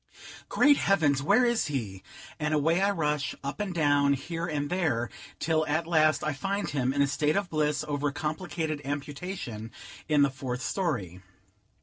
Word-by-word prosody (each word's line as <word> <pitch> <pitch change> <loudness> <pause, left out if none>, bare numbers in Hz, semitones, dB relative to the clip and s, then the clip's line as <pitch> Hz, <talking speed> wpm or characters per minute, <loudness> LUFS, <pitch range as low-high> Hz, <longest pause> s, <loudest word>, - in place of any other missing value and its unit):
Great 290 -1 +5
heavens! 150 -8 +2
where 200 - +4
is 235 -1 +1
he? 110 -10 -4 0.4
and 150 0 0
away 165 +5 +2
I 200 - +3
rush, 150 -7 -1
up 140 +6 -4
and 205 -2 -2
down, 145 -4 +3
here 165 +5 -4
and 145 -3 -2
there, 150 -11 0 0.3
till 160 -1 +1
at 155 +3 0
last 155 -3 +3
I 155 - 0
find 195 +8 -2
him, 130 -3 0
in 140 +1 +2
a - - +2
state 150 +2 +1
of 200 -3 -2
bliss 150 -1 0
over 145 0 -1
a - - 0
complicated 155 +1 -3
amputation, 140 - -5 0.4
in 150 -2 +5
the 140 - +2
fourth 130 -1 -4
story. 110 - -2
150 Hz, 175 wpm, -28 LUFS, 140-170 Hz, 0.4 s, Great